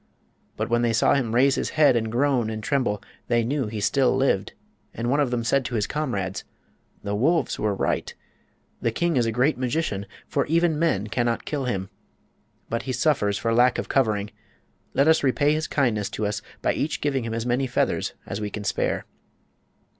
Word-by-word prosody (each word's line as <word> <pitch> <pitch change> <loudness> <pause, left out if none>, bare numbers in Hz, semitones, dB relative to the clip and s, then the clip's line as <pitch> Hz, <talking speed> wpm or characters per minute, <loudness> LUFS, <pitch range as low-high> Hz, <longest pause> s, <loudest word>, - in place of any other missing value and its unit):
But - - -1
when 120 0 +1
they 120 -1 +2
saw 115 - +4
him 120 -5 0
raise 135 +2 +5
his - - -1
head 150 -5 +6
and 110 -1 0
groan 125 -2 +1
and 110 -1 -5
tremble 120 -6 0 0.2
they 120 -1 +2
knew 135 +1 -1
he 105 0 -4
still 130 +7 +2
lived, 130 -7 +1 0.4
and 120 +2 -1
one 145 - +2
of 145 -3 +2
them 120 -1 -1
said 135 +3 +2
to 120 - -3
his 105 -2 +1
comrades: 105 -11 -3 0.6
"The 100 0 -3
wolves 150 +11 +1
were 105 -1 0
right. - - -1 0.7
The - - +1
king 170 +7 0
is 120 -3 +2
a - - 0
great 125 +5 +1
magician, 125 -6 -1 0.2
for 140 - 0
even 165 0 +2
men 155 - +1
cannot 120 +2 -1
kill 145 -3 -2
him. 95 -6 -3 0.8
But 115 - -2
he - - 0
suffers 120 -6 +1
for 115 0 0
lack 120 +2 +4
of - - -4
covering. 105 -5 +1 0.6
Let 140 - +4
us 160 0 +5
repay 145 +2 +2
his 155 +1 -1
kindness 115 -8 0
to 110 - -1
us 105 +1 -2 0.2
by - - +2
each 155 - -2
giving 135 -4 0
him 115 0 -3
as 115 0 -3
many 125 +2 +1
feathers 120 - 0
as 100 - -5
we 105 - -2
can 105 0 -6
spare." - - -1
120 Hz, 200 wpm, -24 LUFS, 110-140 Hz, 0.8 s, head